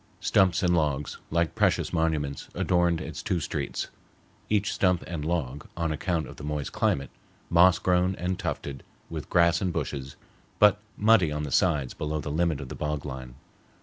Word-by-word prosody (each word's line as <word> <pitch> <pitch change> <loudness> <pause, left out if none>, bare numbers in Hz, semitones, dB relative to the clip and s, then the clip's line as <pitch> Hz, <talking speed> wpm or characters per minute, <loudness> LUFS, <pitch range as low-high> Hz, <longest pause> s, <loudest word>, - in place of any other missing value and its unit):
Stumps 95 0 +3
and 90 -1 +3
logs, 75 -3 -1
like 85 0 +1
precious - - +1
monuments, 75 -4 -1
adorned 85 -2 +2
its - - -6
two 90 - 0
streets, 75 - -3 0.6
each 105 -2 +1
stump 90 -3 +2
and 85 -4 -4
log, 75 -4 -2
on 85 -2 0
account 80 -1 -1
of - - -11
the - - -9
moist 75 -1 -3
climate, 70 -1 0 0.4
moss 90 +2 +6
grown 90 +1 +2
and 90 +1 -2
tufted 70 -7 -4 0.3
with - - -5
grass 85 0 +4
and 95 -2 0
bushes, 70 -5 -4 0.4
but 105 -1 +6 0.2
muddy 105 -7 +4
on 75 0 -2
the 75 - -4
sides 75 -4 +2
below 75 0 -3
the 75 0 -4
limit 80 -1 +1
of 70 - -7
the - - -5
bog 75 -1 -3
line. 65 -3 -7
80 Hz, 175 wpm, -27 LUFS, 75-90 Hz, 0.6 s, moss